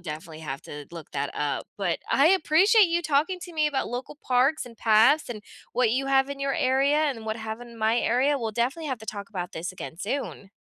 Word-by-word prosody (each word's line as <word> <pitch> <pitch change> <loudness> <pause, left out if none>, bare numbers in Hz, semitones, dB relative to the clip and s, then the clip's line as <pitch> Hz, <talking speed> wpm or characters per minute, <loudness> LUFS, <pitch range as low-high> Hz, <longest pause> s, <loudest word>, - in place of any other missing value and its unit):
definitely 160 -1 -7
have 140 -2 -5
to 145 -1 -9
look 165 -3 -9
that 140 - -2
up, 145 -1 -2
but 180 -4 0
I 285 +4 +5
appreciate 385 +4 +5
you 340 +1 +1
talking 315 +5 +1
to 350 -1 -9
me 305 -1 +2
about 280 -2 -1
local 250 +5 -6
parks, 255 +3 +2
and 230 -2 -12
paths, 225 +8 +4
and 215 -3 -6 0.3
what 245 -3 +2
you 270 +3 0
have 270 0 +3
in 280 0 -6
your 275 0 -1
area, 270 +3 +2
and 280 -8 0
what 220 0 -2
have 220 +1 -6
in 235 -1 -11
my 220 +2 +2
area, 270 +5 +2
we'll 225 -2 -3
definitely 270 +8 -1
have 255 -3 -2
to 220 - -12
talk 200 0 -6
about 180 -3 -5
this 175 +3 -5
again 170 -2 -8
soon. 205 -3 -4
245 Hz, 225 wpm, -26 LUFS, 210-285 Hz, 0.3 s, I